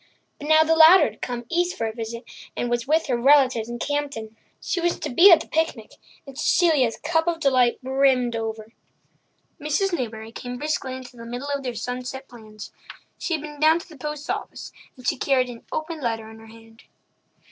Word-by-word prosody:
But 290 Hz, -, -7 dB
now 315 Hz, 0 st, +6 dB
the 325 Hz, +1 st, +2 dB
latter 325 Hz, +4 st, +8 dB
had -, -, -3 dB
come 245 Hz, -1 st, -4 dB
east 350 Hz, +4 st, -1 dB
for 225 Hz, -, -2 dB
a 220 Hz, -, -3 dB
visit, 230 Hz, +1 st, -6 dB, 0.3 s
and 240 Hz, -, -2 dB
was 240 Hz, +1 st, -1 dB
with 315 Hz, +2 st, +2 dB
her 250 Hz, -3 st, 0 dB
relatives 255 Hz, -3 st, +4 dB
in 240 Hz, -, -5 dB
Campden. 275 Hz, -5 st, -4 dB, 0.2 s
She 360 Hz, -, -2 dB
was 345 Hz, 0 st, 0 dB
to -, -, -4 dB
be 350 Hz, +10 st, +7 dB
at 330 Hz, -2 st, +7 dB
the -, -, -10 dB
picnic, 315 Hz, -9 st, -2 dB, 0.3 s
and 275 Hz, -2 st, -11 dB
Cecilia's 290 Hz, -6 st, +2 dB
cup 320 Hz, +1 st, 0 dB
of 340 Hz, -1 st, 0 dB
delight 255 Hz, -5 st, +3 dB
brimmed 260 Hz, -2 st, +2 dB
over. 225 Hz, 0 st, -5 dB, 0.9 s
Mrs. 310 Hz, +6 st, -1 dB
Newbury 225 Hz, -6 st, -4 dB
came 245 Hz, +1 st, -7 dB
briskly 275 Hz, -2 st, -3 dB
into 255 Hz, -1 st, -11 dB
the 230 Hz, -, -10 dB
middle 245 Hz, +4 st, -6 dB
of 280 Hz, -, -2 dB
their 250 Hz, -3 st, -5 dB
sunset 250 Hz, +3 st, -5 dB
plans. 215 Hz, -3 st, -12 dB, 0.5 s
She 335 Hz, -, -1 dB
had 305 Hz, -, -6 dB
been 295 Hz, -1 st, -9 dB
down 315 Hz, +2 st, +5 dB
to 345 Hz, -, -9 dB
the 315 Hz, -, -13 dB
post 300 Hz, +1 st, -6 dB
office, -, -, -5 dB, 0.3 s
and 255 Hz, -1 st, -8 dB
she -, -, +1 dB
carried 255 Hz, -1 st, +1 dB
an 235 Hz, -, -13 dB
open 315 Hz, 0 st, -4 dB
letter 225 Hz, -3 st, -2 dB
in 220 Hz, -, -13 dB
her 225 Hz, -, -14 dB
hand. 225 Hz, +1 st, -17 dB
260 Hz, 200 wpm, -23 LUFS, 235-310 Hz, 0.9 s, latter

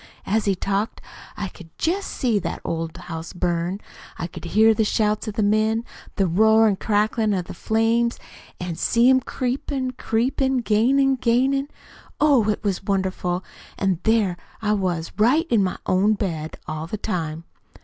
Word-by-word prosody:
As 215 Hz, +2 st, +1 dB
he 200 Hz, -2 st, +2 dB
talked, 200 Hz, +4 st, -2 dB, 0.4 s
I 205 Hz, -, -2 dB
could 175 Hz, -2 st, -14 dB
just 375 Hz, +5 st, -1 dB
see 230 Hz, -5 st, 0 dB
that 170 Hz, -, -4 dB
old 165 Hz, 0 st, -3 dB
house 165 Hz, -2 st, -7 dB
burn. 175 Hz, +1 st, -1 dB, 0.4 s
I 165 Hz, -, -3 dB
could 175 Hz, -, -9 dB
hear 220 Hz, +5 st, +5 dB
the 220 Hz, -, +1 dB
shouts 215 Hz, +1 st, 0 dB
of 210 Hz, -, -4 dB
the 215 Hz, -, +1 dB
men, 215 Hz, +2 st, +2 dB, 0.3 s
the 195 Hz, -, +2 dB
roar 220 Hz, +5 st, +5 dB
an' 200 Hz, -3 st, +1 dB
cracklin' 215 Hz, 0 st, +1 dB
of 180 Hz, -2 st, -2 dB
the -, -, -8 dB
flames, 230 Hz, +2 st, +1 dB, 0.4 s
an' 180 Hz, -2 st, -4 dB
see 235 Hz, +1 st, +3 dB
'em 260 Hz, -, +5 dB
creepin', 260 Hz, +1 st, -2 dB
creepin', 255 Hz, +2 st, 0 dB
gainin', 265 Hz, +5 st, +3 dB
gainin'! 265 Hz, +4 st, +2 dB, 0.5 s
Oh, 275 Hz, -8 st, +4 dB
it 210 Hz, -, -1 dB
was 195 Hz, -2 st, -1 dB
wonderful 190 Hz, -2 st, -1 dB, 0.3 s
an' 190 Hz, -4 st, 0 dB
there 210 Hz, -4 st, +2 dB, 0.2 s
I 210 Hz, -1 st, +1 dB
was 180 Hz, -5 st, -1 dB
right 265 Hz, +10 st, +4 dB
in 225 Hz, -3 st, +4 dB
my 185 Hz, -, -2 dB
own 195 Hz, +4 st, +3 dB
bed, 160 Hz, -7 st, -4 dB
all 155 Hz, +1 st, -4 dB
the 215 Hz, -, -4 dB
time. 165 Hz, -6 st, -3 dB
210 Hz, 165 wpm, -23 LUFS, 180-230 Hz, 0.5 s, hear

